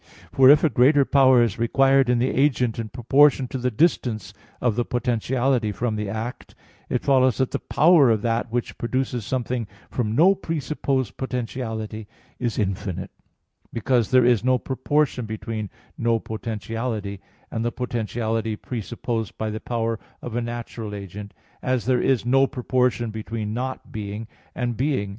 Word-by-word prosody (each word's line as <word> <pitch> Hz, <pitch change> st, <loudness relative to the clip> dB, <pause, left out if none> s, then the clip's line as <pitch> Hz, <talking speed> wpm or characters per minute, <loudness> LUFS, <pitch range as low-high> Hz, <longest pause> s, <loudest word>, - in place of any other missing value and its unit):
For 130 Hz, -1 st, +6 dB
if 145 Hz, +2 st, +7 dB
a 160 Hz, -, +4 dB
greater 140 Hz, +3 st, +5 dB
power 130 Hz, -3 st, +5 dB
is 110 Hz, -4 st, -2 dB
required 135 Hz, +2 st, +3 dB
in 125 Hz, -, +3 dB
the 125 Hz, +2 st, +1 dB
agent 125 Hz, -5 st, +1 dB
in 110 Hz, -1 st, -4 dB
proportion 135 Hz, +4 st, +4 dB
to 130 Hz, -, -4 dB
the 125 Hz, +1 st, 0 dB
distance 110 Hz, -, 0 dB, 0.3 s
of 120 Hz, -4 st, +1 dB
the 120 Hz, -, +1 dB
potentiality 120 Hz, -1 st, 0 dB
from 115 Hz, +2 st, -2 dB
the 105 Hz, -1 st, -3 dB
act, 110 Hz, +4 st, -6 dB, 0.3 s
it 125 Hz, -, -1 dB
follows 130 Hz, -3 st, +3 dB
that 130 Hz, -1 st, 0 dB
the -, -, -1 dB
power 155 Hz, -5 st, +5 dB
of 110 Hz, -2 st, +1 dB
that 115 Hz, 0 st, -1 dB
which 120 Hz, 0 st, -3 dB
produces 125 Hz, -2 st, -2 dB
something 125 Hz, -3 st, -2 dB, 0.2 s
from 110 Hz, -3 st, -1 dB
no 175 Hz, +8 st, +6 dB
presupposed 145 Hz, -, -2 dB
potentiality 110 Hz, -4 st, -4 dB, 0.3 s
is 120 Hz, -3 st, -2 dB
infinite, 95 Hz, -2 st, -2 dB, 0.6 s
because 120 Hz, 0 st, +1 dB
there 130 Hz, -1 st, +5 dB
is 120 Hz, -3 st, +3 dB
no 130 Hz, 0 st, +3 dB
proportion 130 Hz, -1 st, 0 dB
between 110 Hz, -1 st, -4 dB, 0.3 s
"no 115 Hz, 0 st, +2 dB
potentiality" 110 Hz, -1 st, -4 dB, 0.3 s
and 115 Hz, -, -2 dB
the 120 Hz, -, 0 dB
potentiality 115 Hz, -2 st, -2 dB
presupposed 115 Hz, 0 st, -4 dB
by 110 Hz, -1 st, -2 dB
the 110 Hz, -, -4 dB
power 115 Hz, -2 st, -2 dB, 0.2 s
of 120 Hz, -2 st, -5 dB
a 120 Hz, -, 0 dB
natural 115 Hz, -2 st, -5 dB
agent, 100 Hz, +1 st, -8 dB, 0.3 s
as 130 Hz, -2 st, 0 dB
there 125 Hz, -1 st, +2 dB
is 130 Hz, -4 st, +1 dB
no 135 Hz, +2 st, +4 dB
proportion 125 Hz, -2 st, 0 dB
between 110 Hz, 0 st, -4 dB
"not 130 Hz, +3 st, -4 dB
being" 105 Hz, +1 st, -5 dB, 0.3 s
and 120 Hz, -2 st, -2 dB
"being." 130 Hz, -7 st, 0 dB
120 Hz, 155 wpm, -23 LUFS, 110-130 Hz, 0.6 s, if